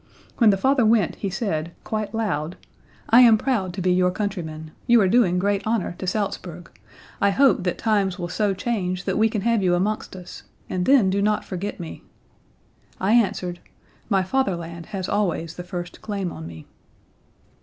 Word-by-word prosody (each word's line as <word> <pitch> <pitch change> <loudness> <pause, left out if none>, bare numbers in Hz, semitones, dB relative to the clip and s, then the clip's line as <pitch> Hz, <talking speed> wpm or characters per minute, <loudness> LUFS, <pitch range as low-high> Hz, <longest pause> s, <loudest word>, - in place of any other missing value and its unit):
When 230 -3 +6
the 195 - +3
father 265 +4 +3
went 215 -4 +2
he 200 - -3
said, 170 -5 -3
quite 215 -1 -3
loud, 180 -7 -2 0.5
'I 235 +2 +8
am 230 -3 +7
proud 215 -7 -1
to 190 - -4
be 180 0 +3
your 180 0 +3
countryman. 170 -6 -4 0.2
You 240 -1 +6
are 195 - +4
doing 190 -4 +3
great 200 +2 +1
honor 220 -4 -1
to 185 - -4
Salzburg; 180 -3 -3 0.5
I 200 - +4
hope 265 +1 +4
that 180 - -1
times 205 -4 +1
will 175 -2 -4
so 195 +2 0
change 185 -4 -2
that 190 - -1
we 220 +1 +4
can 215 -2 -2
have 230 0 +2
you 180 -2 +3
amongst 200 +2 -2
us, 180 -1 -10 0.3
and 180 -1 -2
then 250 -9 +5
do 200 +1 0
not 210 +1 +1
forget 195 +2 -5
me.' 170 -2 -8 1.0
I 190 +3 +1
answered: 185 -6 +1 0.5
'My 195 -3 +2
fatherland 170 -7 -2
has 190 -2 -4
always 175 -5 -1
the 180 - -6
first 175 -1 -7
claim 200 -4 -3
on 80 - -8
me.' 80 -2 -10
195 Hz, 180 wpm, -23 LUFS, 180-215 Hz, 1.0 s, I